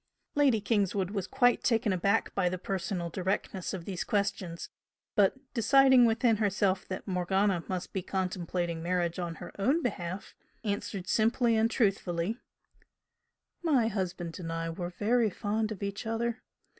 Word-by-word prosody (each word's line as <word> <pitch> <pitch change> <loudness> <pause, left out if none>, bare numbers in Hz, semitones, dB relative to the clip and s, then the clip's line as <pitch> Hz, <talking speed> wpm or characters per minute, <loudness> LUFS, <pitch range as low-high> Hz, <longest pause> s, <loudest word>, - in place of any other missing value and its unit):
Lady 275 -6 +4
Kingswood 200 -3 0
was 195 -3 -3
quite 245 -2 +3
taken 225 -4 +2
aback 200 +4 +1
by 185 -2 +2
the 185 - -3
personal 185 -2 -3
directness 190 +1 -2
of 180 -3 -5
these 185 -3 -3
questions, 200 -4 -2 0.5
but 205 +3 +4 0.2
deciding 260 +2 +6
within 230 0 +3
herself 200 -2 +1
that 185 - -6
Morgana 190 0 +1
must 185 -1 -4
be 190 - -1
contemplating 175 -2 -2
marriage 175 0 -1
on 170 -2 -3
her - - -9
own 275 +11 +2
behalf, 185 -5 -4 0.3
answered 205 -3 -3
simply 230 +2 +3
and 220 +1 +3
truthfully 200 -2 0 1.2
"My 275 -10 +3
husband 180 -5 -3
and 165 -2 -5
I 165 0 -2
were 175 +1 -4
very 220 +5 +2
fond 215 +2 -2
of 200 -2 -5
each 200 +3 -4
other. 230 +1 -1
200 Hz, 145 wpm, -30 LUFS, 180-225 Hz, 1.2 s, deciding